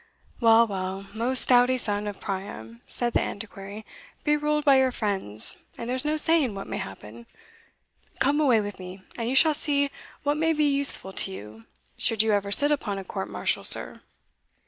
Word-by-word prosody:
"Well, 230 0 +5
well, 190 -1 -5
most 240 +3 0
doughty 250 +1 +4
son 210 -3 -1
of 205 -2 -7
Priam," 120 - -7
said 240 -1 -3
the - - +2
Antiquary, 205 0 -8 0.4
"be 300 0 +2
ruled 300 0 -1
by 275 -2 +5
your 260 -1 +2
friends, 195 - -3 0.2
and 235 - -7
there's 255 +3 -2
no 305 +1 -1
saying 305 -8 +2
what 195 - -7
may - - -6
happen 105 +4 -10 0.9
Come 285 +3 +1
away 250 -7 +3
with 205 -1 -7
me, 185 +1 -10
and 230 -1 -4
you 260 - -2
shall 315 +3 +5
see 285 -1 -1 0.3
what 290 +1 0
may 325 +1 +1
be 300 -1 0
useful 280 -9 +2
to 195 - +1
you 110 - -11 0.3
should 220 -1 +1
you 220 - 0
ever 200 -1 -1
sit 290 +7 +6
upon 220 -9 -2
a 195 - -6
court 190 +1 -6
martial, - - -3
sir." - - +6
225 Hz, 185 wpm, -25 LUFS, 195-280 Hz, 0.9 s, sit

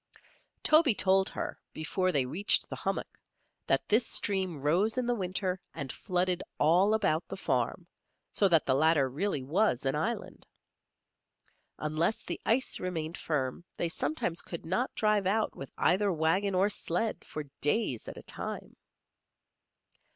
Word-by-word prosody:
Toby 310 -7 +5
told 190 +1 +3
her, - - -5
before 185 +4 0
they 140 -6 +2
reached 185 +11 +2
the - - -6
hummock, - - -4 0.5
that - - +1
this 220 +4 +4
stream 190 -6 0
rose 180 - +2
in 255 - 0
the 245 - +1
winter 185 -2 -2
and 140 -5 -4
flooded 180 -2 -1 0.2
all 180 +8 +4
about 185 -6 0
the - - -6
farm, - - -1 0.5
so 200 - +4
that 165 -4 +3
the 130 - +2
latter 150 0 +3
really 145 +2 -2
was 150 - +1
an 135 - +1
island. 225 +10 -3 1.3
Unless 155 +7 -1
the - - -5
ice 255 +4 +2
remained 170 -3 -3
firm 140 -1 -2
they 170 - 0
sometimes 165 +2 -1
could 170 -2 -8
not 215 +10 0
drive 210 -3 +2
out 215 +3 0
with 135 - -8
either 195 +3 +2
wagon 185 +5 +1
or 190 +2 +4
sled 210 +1 -2
for 155 - -6 0.2
days 145 - 0
at - - -7
a - - -9
time. - - -6
180 Hz, 150 wpm, -30 LUFS, 155-205 Hz, 1.3 s, Toby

